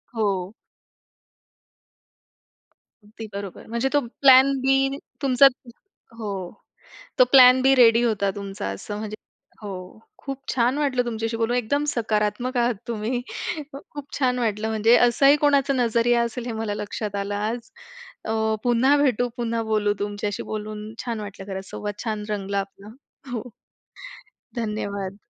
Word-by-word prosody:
हो. 200 -3 -1 2.5
अगदी 220 +2 -10
बरोबर. 200 -2 -7
म्हणजे 235 +4 -1
तो 290 - +5 0.2
प्लॅन 265 0 +7
बी 270 +1 +3 0.5
तुमचा 275 0 +6 0.7
हो. 215 -2 -4 0.9
तो 255 - +8
प्लॅन 255 -1 +8
बी 270 +1 +5
रेडी 235 -2 +6
होता 205 -4 +1
तुमचा 200 0 -5
असं 205 - -6
म्हणजे 215 0 -5 0.5
हो. 205 -2 -6 0.5
खूप 275 -1 -6
छान 250 +2 +2
वाटलं 270 -4 +1
तुमच्याशी 225 -1 -3
बोलून 230 +1 0
एकदम 285 +5 0
सकारात्मक 225 +1 -1
आहात 240 0 +2
तुम्ही. 235 +2 -2 0.5
खूप 285 0 -9
छान 250 -2 +1
वाटलं. 220 -2 -1
म्हणजे 220 +2 +4
असंही 275 +4 +5
कोणाचा 280 -1 +3
नजरिया 235 -1 +2
असेल 235 +1 -4
हे 240 - -3
मला 210 -2 -2
लक्षात 205 0 -5
आलं 200 0 -2
आज. 220 +3 -3 0.6
अ, 220 - -2 0.3
पुन्हा 250 +4 +4
भेटू, 250 -4 +2
पुन्हा 230 -1 -1
बोलू. 210 -1 +2
तुमच्याशी 205 0 -3
बोलून 215 0 -5
छान 235 -3 -3
वाटलं 200 -2 -8
खरंच, 190 0 -6
सोबत 205 -1 -6
छान 215 -3 -3
रंगला 200 -1 -2
आपला. 195 +1 -8 0.4
हो. 245 0 -5 1.0
धन्यवाद. 200 -3 -4
225 Hz, 135 wpm, -24 LUFS, 210-250 Hz, 2.5 s, तो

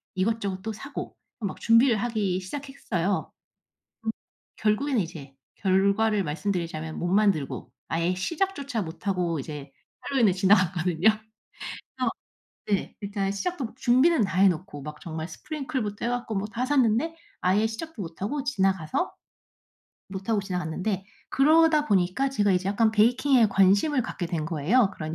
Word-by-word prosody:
이것저것 195 -1 -1
또 220 +1 -3
사고 275 +7 -7 0.2
막 200 -4 -4
준비를 230 +1 +5
하기 210 -5 0
시작했어요. 200 -5 -3 1.3
결국에는 225 +4 +1
이제 160 -6 -7 0.2
결과를 200 +2 +2
말씀드리자면 160 -1 -3
못 175 - -1
만들고 195 -7 +1 0.2
아예 170 +2 0
시작조차 280 - -2
못 165 +2 -9
하고 180 -4 0
이제 145 -1 -8 0.4
핼러윈을 235 -8 +4
지나갔거든요. 185 -2 +3 0.9
그래서 - - +1 0.6
네, 200 -2 -1
일단 200 -1 -2
시작도 285 - -2
뭐 225 - -8
준비는 265 +5 +4
다 185 -1 -2
해놓고 185 -4 +2
막 150 +1 -8
정말 160 -1 -5
sprinkle부터 260 - -4
해 235 - +1
갖고 245 -3 -2
뭐 195 +1 -1
다 240 +2 -1
샀는데 265 +3 +2 0.3
아예 195 +4 +3
시작도 225 +2 -6
못 165 0 -8
하고 270 +8 -2
지나가서, 195 - 0 1.0
못 190 +1 -7
하고 220 -3 +2
지나갔는데 185 +1 -3 0.3
그러다 310 +1 +4
보니까 190 +6 +2
제가 205 -7 +2
이제 185 +1 +1
약간 220 +2 +3
베이킹에 240 +3 +4
관심을 200 +9 +3
갖게 175 -5 -4
된 165 -3 -2
거예요 170 - +2
그런 155 0 -5
200 Hz, 340 characters per minute, -26 LUFS, 180-240 Hz, 1.3 s, 준비를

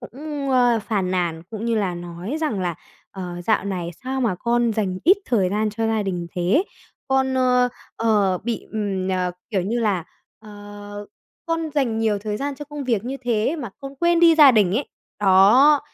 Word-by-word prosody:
cũng, 280 +2 -5
ờ, 245 -2 +4
phàn 195 -5 -1
nàn 170 -3 -1
cũng 220 -1 -5
như 235 -1 0
là 195 -5 0
nói 175 - -6
rằng 240 -12 -1
là 175 -2 -1 0.4
"Ờ, 175 -2 -7
dạo 220 - +2
này 180 -4 -3
sao 265 +1 -2
mà 220 -7 +1
con 235 +3 +1
dành 190 -4 -2
ít 370 +5 +6
thời 200 -7 +1
gian 215 +1 0
cho 225 +1 -2
gia 220 -1 0
đình 180 -3 -3
thế, 185 - +2 0.5
con, 265 0 +1
ờ, 250 -1 +3 0.3
ờ, 205 -5 +2
bị, 230 +3 -4
ừm, 195 -3 -2
ờ, 180 -1 -1 0.2
kiểu 195 -5 0
như 235 +5 -1
là, 195 -6 0 0.3
ờ, 205 -1 -10 0.4
con 330 -1 -2
dành 240 -6 0
nhiều 215 -2 +1
thời 210 0 -4
gian 280 +3 -3
cho 295 - -8
công 295 -1 -7
việc 230 -4 0
như 260 +3 -4
thế 240 +6 0
mà 245 -9 -6
con 275 0 -8
quên 340 +2 +2
đi 335 -1 +7
gia 295 -3 +8
đình 205 -6 +3
ấy." 275 - -2 0.3
Đó, 210 +10 +6
220 Hz, 195 wpm, -22 LUFS, 190-260 Hz, 0.5 s, gia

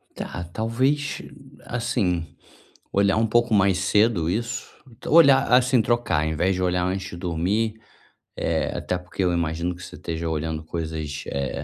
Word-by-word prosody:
Tá, 85 - -5
talvez, 130 +6 0 0.4
assim, 115 -8 -1 0.7
olhar 100 +1 +3
um 110 - +3
pouco 120 +1 +2
mais 100 -2 +4
cedo 100 -3 +2
isso. 115 +5 -2 0.4
Olhar 140 -4 +6
assim, 125 -1 +5
trocar 115 -10 +1
invés 90 +5 +1
de 90 - -3
olhar 90 0 +1
antes 95 +1 -2
de 90 - -7
dormir, 95 +6 -1 0.6
eh, - - -1
até 90 - -2
porque 90 +2 -5
eu 90 - +2
imagino 85 +1 -1
que 90 - -12
você - - -9
esteja 85 0 -4
olhando 80 0 -3
coisas, 80 -3 -4
eh, 70 -1 -2
90 Hz, 150 wpm, -24 LUFS, 85-115 Hz, 0.7 s, Olhar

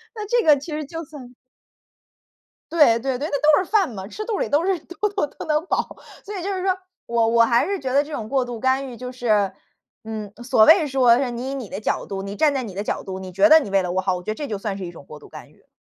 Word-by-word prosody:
那 425 - -5
这 475 -1 +1
个 300 -2 +6
其 290 +4 -8
实 300 -1 -3
就 330 +3 -7
算 265 -5 -12 1.4
对， 295 -9 +5
对， 260 0 -2
对， 300 +3 -3
那 285 - -1
都 305 +5 +4
是 - - -18
饭 410 -5 +3
嘛， 190 -3 -7
吃 430 - -6
肚 430 -3 -2
里 - - -1
都 295 +4 +2
是 385 -3 +1
都 355 +6 -3
都 400 -7 -1
都 - - -10
能 305 +1 +1
饱， - - -2 0.3
所 415 0 -7
以 365 - -5
就 395 - -2
是 370 -1 -3
说， 375 -1 +1 0.3
我 230 -1 +1
我 230 0 +5
还 235 +1 +2
是 395 -1 -2
觉 260 -2 -3
得 285 +2 +3
这 305 - -11
种 220 -5 -4
过 265 -1 +1
度 240 -2 -7
干 265 +1 +1
预 245 - -9
就 250 +1 -7
是， 215 -6 +1 0.5
嗯， 215 -2 -6
所 240 -3 +4
谓 320 -1 +6
说 260 -4 +4
是， 265 -2 -1
你 240 +2 -5
以 - - -3
你 250 -7 -6
的 195 - -5
角 - - -1
度， 195 -1 -5
你 200 +1 -6
站 300 +6 +3
在 270 -2 -1
你 205 -6 -7
的 200 - -3
角 - - -3
度， 190 -1 -6
你 185 -1 -8
觉 305 - +4
得 315 - +9
你 205 - -6
为 195 - +3
了 180 - -3
我 185 - +1
好， 185 -1 0
我 180 - -7
觉 195 - -4
得 215 - -1
这 290 - -5
就 210 -5 -4
算 200 -1 -4
是 190 - -6
一 175 - -7
种 150 - -13
过 150 - -11
度 - - -15
干 - - -12
预。 - - -28
260 Hz, 315 characters per minute, -22 LUFS, 215-310 Hz, 1.4 s, 得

